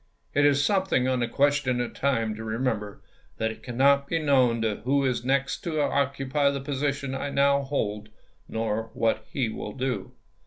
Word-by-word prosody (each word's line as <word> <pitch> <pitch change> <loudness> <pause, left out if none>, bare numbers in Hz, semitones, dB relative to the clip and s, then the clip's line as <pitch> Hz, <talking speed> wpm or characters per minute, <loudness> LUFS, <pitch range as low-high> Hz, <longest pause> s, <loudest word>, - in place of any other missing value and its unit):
It 145 0 +4
is 145 0 +3
something 190 -9 +2
on 130 -1 +1
the 120 - 0
question 140 -1 +1
of 120 - -3
time 115 -6 0
to 110 +1 -7
remember 110 -2 -3 0.3
that 110 0 0
it - - -11
cannot 140 +3 +3
be 165 - 0
known 130 -7 +3 0.2
who 140 +2 +2
is 125 -2 0
next 135 +1 +1
to 160 -3 -1
oc 140 -1 +1
cupy 140 +1 +1
the 140 - -3
position 140 0 -2
I 135 +1 -3
now 140 0 +3
hold 110 -6 -3 0.4
nor 110 0 -2
what 110 -1 0
he 130 -4 0
will 105 -1 -6
do. 130 -1 -3
135 Hz, 180 wpm, -26 LUFS, 115-140 Hz, 0.4 s, It